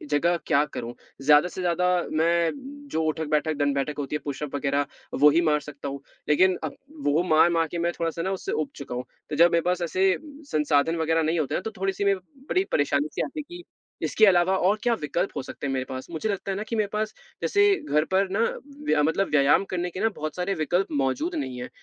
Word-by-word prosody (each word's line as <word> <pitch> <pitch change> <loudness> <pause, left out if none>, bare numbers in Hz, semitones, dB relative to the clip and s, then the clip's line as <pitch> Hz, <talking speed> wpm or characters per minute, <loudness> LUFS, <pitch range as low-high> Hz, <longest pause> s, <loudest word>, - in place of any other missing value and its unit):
जगह 170 +3 +2
क्या 140 - +4
करूँ? 120 0 -5 0.3
ज़्यादा 150 +3 +5
से 180 - -6
ज़्यादा, 180 +1 +1 0.2
मैं 170 +1 +2 0.4
जो 160 - +2
उठक-बैठक, 155 0 0
दण्ड-बैठक 145 0 0
होती 145 +1 -3
है, - - -1
पुशअप 145 0 -4
वगैरह, 140 0 0 0.3
वो 150 +2 +6
ही - - +5
मार 150 - +3
सकता 140 -1 -7
हूँ, 140 0 -6 0.3
लेकिन 180 +4 +4
अब - - -4 0.3
वो 150 +4 +3
मार-मार 165 0 +4
के 175 - -3
मैं - - +1
थोड़ा-सा 165 0 -1
ना, 190 +3 -1
उससे 195 - -4
ऊब 440 -10 -1
चुका 140 -3 -6
हूँ, 125 +1 -4 0.2
तो 150 - -3
जब 170 +3 +6
मेरे 170 - +3
पास 180 +1 0
ऐसे 185 +3 +1 0.4
संसाधन 150 +1 +2
वगैरह 165 0 +1
नहीं 160 +2 +1
होते 150 - -1
ना, - - -1
तो 220 - -5
थोड़ी-सी 195 +1 -1
में 200 0 +4 0.3
बड़ी 370 - +2
परेशानी-सी 145 +1 +1
आती 305 - -4
है - - -4
कि 350 - -11 0.4
इसके 220 - +4
अलावा 185 -1 +4
और 205 +2 +3
क्या 240 -1 +3
विकल्प 170 +6 -1
हो - - -2
सकते 140 - -7
हैं 135 - -1
मेरे 130 -1 -1
पास? 130 0 -6
मुझे 170 +7 -2
लगता 195 -1 -2
है - - -2
ना 210 - -3
कि 230 - -1
मेरे 215 -2 +1
पास, 215 0 -1 0.3
जैसे 405 -1 +3 0.3
घर 150 +1 +3
पर 195 +1 +3
ना, 195 +3 -1 0.5
व्या 150 - +3
मतलब 160 +6 +1
व्यायाम 145 +4 +4
करने 180 0 -1
के 180 - -7
ना, 225 +2 +2
बहुत 155 0 -4
सारे 180 +2 -1
विकल्प 175 +5 +1
मौजूद 305 - -1
नहीं 130 - -4
हैं, 125 - -6
165 Hz, 225 wpm, -25 LUFS, 145-190 Hz, 0.5 s, वो